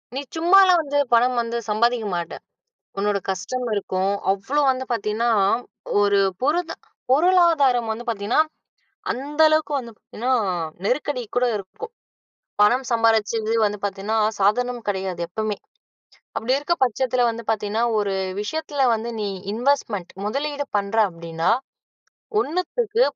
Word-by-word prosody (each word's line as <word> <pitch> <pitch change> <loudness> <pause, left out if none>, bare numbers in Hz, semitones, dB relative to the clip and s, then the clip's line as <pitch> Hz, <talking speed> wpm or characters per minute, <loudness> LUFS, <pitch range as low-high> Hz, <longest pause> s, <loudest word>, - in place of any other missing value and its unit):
நீ 275 - -2 0.2
சும்மாலாம் 365 +1 +6
வந்து 285 -1 -2 0.2
பணம் 245 +1 +4
வந்து 235 0 -3
சம்பாதிக்க 230 +1 +1
மாட்ட. 170 -1 -4 0.7
உன்னோட 205 0 +1
கஷ்டம் 245 +7 -3
இருக்கும், 190 -1 -1 0.2
அவ்ளோ 260 +10 -1
வந்து 260 0 -2
பார்த்தீங்கன்னா, 230 +1 0 0.7
ஒரு 200 0 +3 0.2
புரத 330 +5 +1 0.4
பொருளாதாரம் 295 -8 +4
வந்து 235 +2 -7
பார்த்தீங்கன்னா, 225 +6 +2 0.7
அந்த 290 +5 -5
அளவுக்கு 310 -1 +1
வந்து 235 -3 -8 0.2
ஏன்னா 245 +4 -1 0.5
நெருக்கடி 255 +3 -1
கூட 250 0 +3
இருக்கும். 205 - -8 0.7
பணம் 245 +5 +4
சம்பாரிச்சது 225 -1 +2
வந்து 210 0 -1
பார்த்தீன்னா 200 +2 -3 0.2
சாதாரணம் 240 +4 +1
கெடையாது, 190 -3 -2
எப்பவுமே. 210 +3 -3 0.8
அப்டி 235 +3 -1
இருக்க 295 +4 0
பட்சத்துல 255 +1 0
வந்து 230 0 -6
பார்த்தீங்கன்னா, 215 +1 -1 0.2
ஒரு 200 -2 0 0.3
விஷயத்தில 290 +4 -2
வந்து 225 +2 -4
நீ 205 - -1 0.2
இன்வெஸ்ட்மெண்ட் 230 -6 -1
முதலீடு 285 +6 -2
பண்ற 200 +1 -2
அப்படின்னா, 165 -1 -2 0.9
1த்துக்கு 415 - 0
235 Hz, 120 wpm, -22 LUFS, 205-285 Hz, 0.9 s, சும்மாலாம்